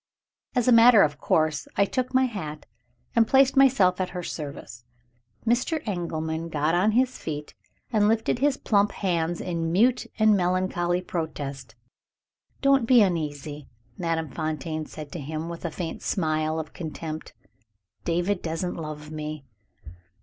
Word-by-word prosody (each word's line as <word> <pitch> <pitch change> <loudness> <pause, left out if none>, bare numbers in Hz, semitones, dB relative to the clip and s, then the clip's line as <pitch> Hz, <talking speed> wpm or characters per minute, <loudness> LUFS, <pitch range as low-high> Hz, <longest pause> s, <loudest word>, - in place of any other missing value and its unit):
As 245 -1 +1
a - - +6
matter 230 -2 +8
of 145 -1 -1
course 155 -2 +1
I 200 - +4
took 255 +4 -2
my 260 0 +4
hat, 155 -11 -6 0.5
and 230 -1 +5
placed 270 0 +4
myself 210 -10 +4
at 185 - -1
her 180 - -4
service. 140 -8 -7 0.6
Mr. 245 +8 +1
Engelman 165 -3 -3
got 155 +1 0
on 190 +5 +3
his 255 +2 +1
feet, 150 -1 -5 0.4
and 210 -1 +4
lifted 225 +2 +1
his 280 0 +2
plump 205 -5 +2
hands 170 -3 -1
in 165 -2 -2
mute 240 +8 +3
and 215 -2 +5
melancholy 180 -1 0
protest. 140 -8 -5 0.9
"Don't 275 -4 +4
be 245 -3 +7
uneasy," 150 -5 -3 0.3
Madame 165 -4 -2
Fontaine 155 +1 -3
said 150 -2 -9
to 170 - -6
him, 155 +3 -5
with 170 0 -7
a - - 0
faint 165 +1 -5
smile 155 -3 0
of 155 -1 -7
contempt. 160 -1 -6 0.7
"David 175 +3 0
doesn't 165 +2 -3
love 155 -1 -7
me!" 155 -2 -6
170 Hz, 145 wpm, -26 LUFS, 155-210 Hz, 0.9 s, matter